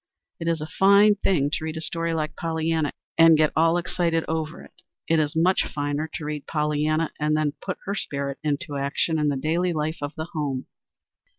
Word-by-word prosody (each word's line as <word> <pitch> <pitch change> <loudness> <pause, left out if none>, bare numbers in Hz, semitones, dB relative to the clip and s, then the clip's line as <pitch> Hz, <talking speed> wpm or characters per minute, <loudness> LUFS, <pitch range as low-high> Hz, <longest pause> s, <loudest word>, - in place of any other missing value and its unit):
It 165 - -4
is 165 -2 0
a - - -3
fine 200 +2 +7
thing 160 -8 +1
to 155 - -2
read 160 0 -4
a - - -2
story 165 +1 -2
like 155 -1 -2
Pollyanna 160 -2 -1 0.3
and 165 -1 +8
get 155 0 +3
all 165 +2 +4
excited 170 -2 0
over 160 0 -3
it. - - -19 0.3
It 165 -1 +3
is 150 0 0
much 180 +4 +3
finer 145 +2 -2
to 155 - -5
read 150 -1 -5
Pollyanna 150 +1 0
and 150 0 +1
then 150 -2 0
put 185 - -4
her 200 - -2
spirit 140 -7 -3
into 150 0 -2
action 140 +3 0
in 150 - +1
the 145 -2 +1
daily 170 +5 0
life 155 +1 -2
of 145 +1 -4
the 160 - -4
home. 140 -5 -2
155 Hz, 200 wpm, -24 LUFS, 150-165 Hz, 0.3 s, and